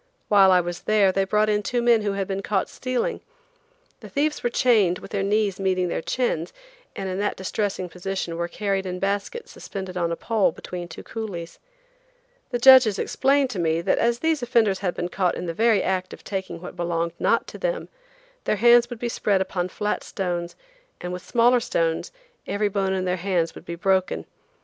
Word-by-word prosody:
While 195 -2 +6
I 180 -1 +5
was 175 0 -5
there 205 -3 +5
they 195 +1 +1
brought 210 +2 +2
in 210 -1 +1
two 240 +4 -1
men 235 -2 +4
who 205 -1 -1
had 195 -1 -2
been 195 0 -2
caught 195 -1 0
stealing. 255 - -2 0.8
The - - -11
thieves 300 +2 0
were 240 - 0
chained 215 -8 +3
with - - -12
their 200 - -1
knees 200 -1 +1
meeting 185 -2 +1
their - - -2
chins, 175 -7 -1 0.4
and 195 - -4
in 185 +1 -3
that 205 - 0
distressing 190 -1 -2
position 180 0 -4
were 170 +1 -2
carried 195 +1 -2
in 180 0 -3
baskets 200 - -3
suspended 190 -2 -7
on 170 -1 0
a - - 0
pole 220 +2 +1
between 175 -1 -7
two 165 - -10
coolies. 195 -7 -6 0.9
The 245 - -1
judges 250 -4 +7
explained 275 -1 +1
to 195 - -4
me 165 -1 +1
that - - +1
as 235 0 +2
these 320 +2 0
offenders 225 -5 +2
had 180 -3 -2
been 175 - -2
caught 180 -1 0
in - - -5
the 165 - -3
very 220 +1 +3
act 185 -1 -1
of - - -12
taking 190 -4 -4
what 180 - -8
belonged 170 -1 -1
not - - +2
to - - -10
them, - - -2 0.6
their - - +2
hands 240 +2 +5
would 245 - -6
be 240 - -3
spread 205 -4 +1
upon 185 -1 -2
flat 210 +3 -2
stones 175 -3 -3 0.4
and 180 0 -5
with 180 0 -6
smaller 245 +1 +4
stones 165 -8 -1 0.4
every 205 0 0
bone 195 -1 0
in 185 -1 -1
their 180 0 0
hands 175 -2 0
would - - -12
be 170 - -5
broken. 185 - 0
195 Hz, 200 wpm, -24 LUFS, 180-225 Hz, 0.9 s, judges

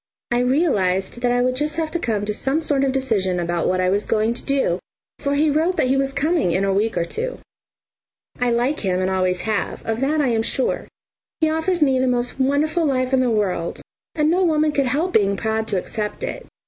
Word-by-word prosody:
I 240 - +2
realised 240 - +1
that 245 -1 +2
I 245 0 +2
would 255 0 +1
just 300 +3 -1
have 320 -1 -1
to 345 - -1
come 215 -8 -1
to 210 - -2
some 270 +8 0
sort 290 -4 +1
of 270 - +2
decision 215 -9 0
about 175 -1 -1
what 185 0 +1
I 185 0 +2
was 205 +2 0
going 220 +1 +1
to - - -5
do, 270 -11 0 0.4
for 285 -1 -1
he 300 +1 +3
wrote 330 +5 +1
that 255 - +2
he 265 - +3
was 270 0 +1
coming 300 - +1
in 190 +3 +1
a 195 - +1
week 215 +3 0
or 170 - +1
two. - - -3 1.0
I 250 0 +1
like 245 +5 +1
him 185 -3 0
and 185 0 0
always 185 -1 0
have, 215 -2 -2
of 225 0 -1
that 290 +4 +1
I 280 -4 +2
am 225 -2 +1
sure. 250 +3 -1 0.5
He 315 -1 +2
offers 320 +1 +1
me 265 -3 +3
the 260 - +1
most 245 +1 -1
wonderful 290 +5 +1
life 260 -3 0
in 265 - +4
the 255 -1 +2
world, 195 -6 -1 0.4
and 305 0 +2
no 365 +2 +2
woman 310 -3 +2
could 280 -3 +1
help 310 +8 0
being 200 -2 +3
proud 220 0 -1
to 200 - 0
accept 210 +3 -4
it. - - -5
255 Hz, 230 wpm, -21 LUFS, 205-295 Hz, 1.0 s, in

